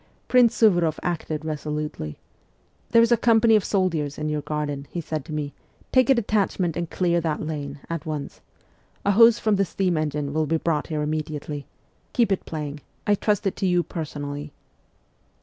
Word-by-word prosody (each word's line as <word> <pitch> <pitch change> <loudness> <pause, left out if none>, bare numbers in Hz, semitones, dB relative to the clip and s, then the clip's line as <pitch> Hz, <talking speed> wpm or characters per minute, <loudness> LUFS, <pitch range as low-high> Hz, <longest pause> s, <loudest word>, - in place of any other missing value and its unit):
Prince 245 -2 +5
Suvoroff 175 -8 +3
acted 160 -3 -3
resolutely. 150 - -4 0.4
' - - -39
There 230 0 +6
is 230 - +2
a 235 - +6
company 225 -1 +5
of 210 - +3
soldiers 165 -8 0
in 155 0 -2
your 150 -1 -1
garden,' 145 -1 -3
he 175 - -4
said 155 -3 -3
to - - -9
me: 150 -2 -3 0.2
' - - -32
take 255 -1 +5
a 270 - +7
detachment 200 -6 0
and 170 -1 -3
clear 175 -2 +1
that 155 -1 -2
lane 145 -2 -5
at 165 -2 -4
once. 155 -3 -5 0.6
A 200 - +4
hose 230 +3 +7
from 215 -3 +1
the 195 - +3
steam 185 -2 0
engine 150 -2 -2
will 155 0 +1
be 165 - +2
brought 155 -2 -1
here 155 -2 -2
immediately. 150 -1 -4 0.5
Keep 235 -5 +2
it 195 - 0
playing. 150 -2 -4 0.3
I 205 - +4
trust 205 0 +1
it 195 - 0
to 190 - 0
you 175 -1 +3
personally.' 145 -3 -5
160 Hz, 185 wpm, -24 LUFS, 150-195 Hz, 0.6 s, a